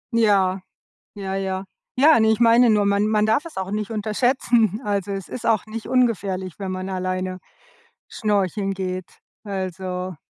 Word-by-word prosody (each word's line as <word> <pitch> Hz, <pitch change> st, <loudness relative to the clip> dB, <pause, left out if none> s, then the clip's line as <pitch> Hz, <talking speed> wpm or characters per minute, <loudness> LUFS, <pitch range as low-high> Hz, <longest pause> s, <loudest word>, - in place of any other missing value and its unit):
Ja, 195 Hz, -4 st, +3 dB, 0.6 s
ja, 195 Hz, -1 st, -4 dB
ja, 190 Hz, -1 st, -2 dB, 0.3 s
nein, 280 Hz, -5 st, +6 dB
ich 220 Hz, +1 st, +2 dB
meine 235 Hz, +1 st, +6 dB
nur 210 Hz, -2 st, +3 dB
man 200 Hz, +1 st, +2 dB
man 215 Hz, -1 st, +2 dB
darf 220 Hz, +9 st, +1 dB
es 330 Hz, -, -10 dB
auch 190 Hz, +1 st, -4 dB
nicht 210 Hz, 0 st, -3 dB
unterschätzen. 225 Hz, 0 st, +1 dB
Also, 200 Hz, -1 st, -1 dB
es 195 Hz, -3 st, -6 dB
ist 250 Hz, -, -6 dB
auch 225 Hz, -4 st, +2 dB
nicht 215 Hz, 0 st, -6 dB
ungefährlich, 200 Hz, -8 st, 0 dB
wenn 195 Hz, -2 st, -5 dB
man 185 Hz, +1 st, -4 dB
alleine 185 Hz, 0 st, -3 dB, 0.7 s
schnorcheln 200 Hz, -2 st, 0 dB
geht, 185 Hz, -1 st, -4 dB, 0.4 s
also 185 Hz, -2 st, -4 dB
200 Hz, 150 wpm, -22 LUFS, 185-220 Hz, 0.7 s, nein